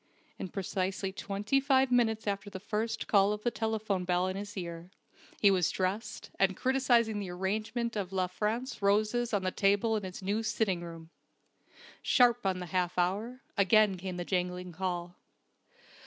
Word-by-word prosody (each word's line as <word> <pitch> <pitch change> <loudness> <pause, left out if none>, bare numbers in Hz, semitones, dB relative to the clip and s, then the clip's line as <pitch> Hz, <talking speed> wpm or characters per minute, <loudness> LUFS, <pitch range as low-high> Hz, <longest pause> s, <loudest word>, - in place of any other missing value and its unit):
In - - -3
precisely 190 0 -2
twenty 205 +7 0
five 265 -1 +3
minutes 225 -3 +2
after 200 0 -2
the 190 -2 -7
first 220 +3 -2
call 200 0 +4
of 210 0 -6
the 240 - +1
telephone 220 -5 -1
bell 180 0 +1
in 185 0 -2
his 205 +1 -6
ear, 170 -1 -6 0.5
he 200 - +6
was 180 -4 +2
dressed, 190 +4 -3
and 195 -1 +3
criticising 240 -5 +2
the 195 -3 -4
arrangement 215 +6 -2
of 195 -3 -3
La 185 -1 +1
France 215 +8 -3
roses 215 +4 +2
on 205 -3 0
the 185 - 0
table 205 +4 +2
in 215 - -1
his 185 0 -7
new 205 +3 0
sitting 220 -5 0
room. 165 -1 -9 0.9
Sharp 245 -3 +4
on 190 -1 +1
the 180 - -5
half 180 -1 0
hour, 210 +9 -1
again 205 0 +4
came 185 0 -5
the 175 - -4
jangling 180 -1 -2
call. 175 0 -4
200 Hz, 170 wpm, -31 LUFS, 185-220 Hz, 0.9 s, he